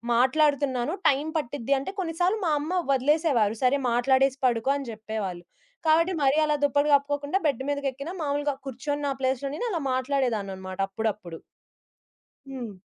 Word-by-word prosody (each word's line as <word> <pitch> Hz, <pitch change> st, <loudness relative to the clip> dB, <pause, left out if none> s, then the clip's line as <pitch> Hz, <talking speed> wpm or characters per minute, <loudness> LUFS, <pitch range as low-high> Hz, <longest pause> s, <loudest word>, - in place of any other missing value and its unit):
మాట్లాడుతున్నాను. 270 Hz, +1 st, +2 dB
టైం 285 Hz, +3 st, +2 dB
పట్టిద్ది 280 Hz, -2 st, -1 dB
అంటే 275 Hz, -, -5 dB
కొన్ని 330 Hz, -3 st, -2 dB
సార్లు 370 Hz, +5 st, +2 dB
మా 320 Hz, -, +2 dB
అమ్మ 310 Hz, +5 st, -4 dB, 0.2 s
వదిలేసేవారు. 270 Hz, -5 st, +2 dB
సరే 255 Hz, +3 st, +4 dB
మాట్లాడేసి 265 Hz, +2 st, +3 dB
పడుకో 235 Hz, +1 st, +1 dB
అని 275 Hz, -3 st, -5 dB
జేప్పేవాళ్ళు. 215 Hz, -5 st, -5 dB, 0.4 s
కాబట్టి 330 Hz, +4 st, +4 dB
మరీ 275 Hz, +2 st, +3 dB
అలా 300 Hz, -1 st, +2 dB
దుప్పటి 285 Hz, +1 st, +2 dB
కప్పుకోకుండా 285 Hz, +4 st, +1 dB
బెడ్ 270 Hz, -3 st, +1 dB
మీదకేక్కినా 285 Hz, +2 st, -3 dB
మామూలుగా 290 Hz, 0 st, 0 dB
కూర్చొని 290 Hz, +3 st, -3 dB
నా -, -, 0 dB
ప్లేస్‌లో 265 Hz, +1 st, -1 dB
నేను 485 Hz, -, -3 dB
అలా 335 Hz, -, -1 dB
మాట్లాడేదానన్నమాట 215 Hz, -9 st, -2 dB
అప్పుడప్పుడు. 195 Hz, -5 st, -4 dB, 1.1 s
హ్మ్. 240 Hz, -6 st, -6 dB
275 Hz, 140 wpm, -26 LUFS, 235-290 Hz, 1.1 s, సరే